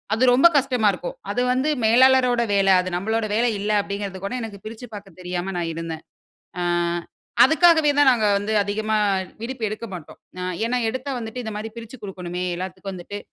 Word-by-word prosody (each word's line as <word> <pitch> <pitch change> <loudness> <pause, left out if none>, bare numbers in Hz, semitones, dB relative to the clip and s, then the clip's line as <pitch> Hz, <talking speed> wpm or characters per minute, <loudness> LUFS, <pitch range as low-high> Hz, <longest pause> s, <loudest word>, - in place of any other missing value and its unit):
அது 235 - 0
ரொம்ப 270 +7 +7
கஷ்டமா 255 -5 +2
இருக்கும். - - -6 0.2
அது 245 - 0
வந்து 260 +4 0 0.2
மேலாளரோட 250 +1 +5
வேல. 195 0 +2
அது 185 - -4
நம்பலோட 220 +4 -1
வேல 235 - +2
இல்ல 205 +2 -1
அப்டிங்கறது 200 -1 -5
கூட 200 - -4
எனக்கு 220 -3 -7
பிரிச்சு 230 +3 -8
பாக்கத் 195 -4 -10
தெரியாம 180 +1 -4
நான் 170 -1 -2
இருந்தேன். 165 -1 -6 0.6
ஆ - - -1 0.8
அதுக்காகவே 320 +1 +5
தான் 290 - +6
நாங்க 220 -3 +1
வந்து 205 +2 -3
அதிகமா 215 +2 -1 0.5
விடுப்பு 245 0 -6
எடுக்க 215 +2 -5
மாட்டோம். 170 -4 -10 0.5
ஏன்னா, 250 - 0
எடுத்தா 260 +3 -5
வந்துட்டு 235 +2 -6
இந்த 220 - -4
மாரி 220 +1 -6
பிரிச்சு 230 +2 -9
குடுக்கணுமே. 180 -2 -5
எல்லாத்துக்கும் 190 +2 -6
வந்துட்டு 185 +3 -7
220 Hz, 170 wpm, -23 LUFS, 195-250 Hz, 0.8 s, ரொம்ப